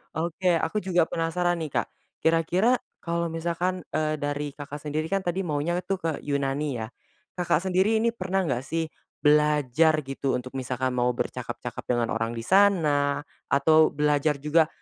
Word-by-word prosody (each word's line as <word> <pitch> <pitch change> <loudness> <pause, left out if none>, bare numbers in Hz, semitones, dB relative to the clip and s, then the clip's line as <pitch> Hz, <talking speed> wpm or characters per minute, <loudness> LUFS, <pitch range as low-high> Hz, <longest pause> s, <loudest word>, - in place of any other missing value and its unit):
oke 170 +3 0
aku 165 +6 -2
juga 180 -3 +2
penasaran 170 +1 0
nih 155 -3 -4
Kak, - - -20 0.4
kira-kira 175 +9 +3 0.2
kalau 170 0 -1
misalkan, 170 +2 -2
eee, 155 0 0
dari 145 0 -2
Kakak 145 0 -7
sendiri 155 +1 -2
kan 195 - +2
tadi 180 +2 -1
maunya 165 +2 -1
tuh 195 - -1
ke 165 -2 -1 0.2
Yunani 140 0 -1
ya. 110 - -4 0.5
Kakak, 175 -1 +1
sendiri 190 +4 +2
ini 235 - +3
pernah 190 -3 -1
enggak 130 -5 -1
sih, 165 +1 -1 0.4
belajar 150 0 +4
gitu 135 -1 -2
untuk 125 +1 -5
misalkan 130 0 -2
mau 125 0 +2
bercakap-cakap - - -5
dengan 120 -2 0
orang 115 +1 -1
di 115 - -5
sana, 150 - +3 0.2
atau 155 +3 +5
belajar 150 0 +2
juga, 155 +1 +4
155 Hz, 160 wpm, -26 LUFS, 145-175 Hz, 0.5 s, atau